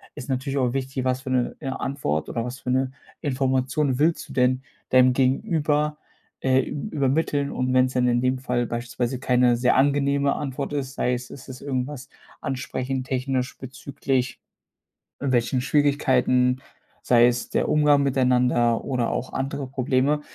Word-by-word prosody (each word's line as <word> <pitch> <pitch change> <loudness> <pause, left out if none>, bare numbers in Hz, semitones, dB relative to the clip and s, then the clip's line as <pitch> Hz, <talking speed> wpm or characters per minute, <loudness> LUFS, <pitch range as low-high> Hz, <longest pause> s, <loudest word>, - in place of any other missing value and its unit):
ist 125 - -8
natürlich 135 +1 -2
auch 125 -2 +1
wichtig, 130 -1 -3
was 130 0 0
für 130 - -7
'ne, 125 -1 0
äh, 140 - -6
Antwort 130 - -2
oder 115 - -3
was 125 +1 -6
für 125 - -6
'ne 130 0 +1 0.3
Information 135 0 0
willst 165 +2 +1
du - - -10
denn 130 0 +2 0.3
deinem 130 0 +5
Gegenüber, 150 +3 +1 0.4
äh, 130 0 +3
üb 150 +9 -5
übermitteln? 140 0 +1
Und 130 0 -1
wenn 130 0 +5
es 130 - -4
dann 125 -1 +2
in 120 0 +2
dem 130 0 +1
Fall 125 -2 -1
beispielsweise 120 +2 -3
keine 125 -2 +3
sehr 125 +1 +2
angenehme 140 0 +2
Antwort 140 0 -4
ist, 135 -1 -3
sei 125 - 0
es, 125 0 -4
es 140 - -11
ist 130 -1 -9
irgendwas 130 0 -4 0.3
ansprechend 130 0 -3
technisch 130 0 -2
bezüglich 130 -1 -3 0.8
welchen 125 -1 +1
Schwierigkeiten, 130 -3 +2 0.4
sei 120 -1 +5
es 120 0 -1
der - - 0
Umgang 150 -1 +4
miteinander 125 -3 +2
oder 125 -4 -1
auch 130 - -3
andere 135 0 -3
Probleme, 135 +3 +1
130 Hz, 160 wpm, -24 LUFS, 125-140 Hz, 0.8 s, deinem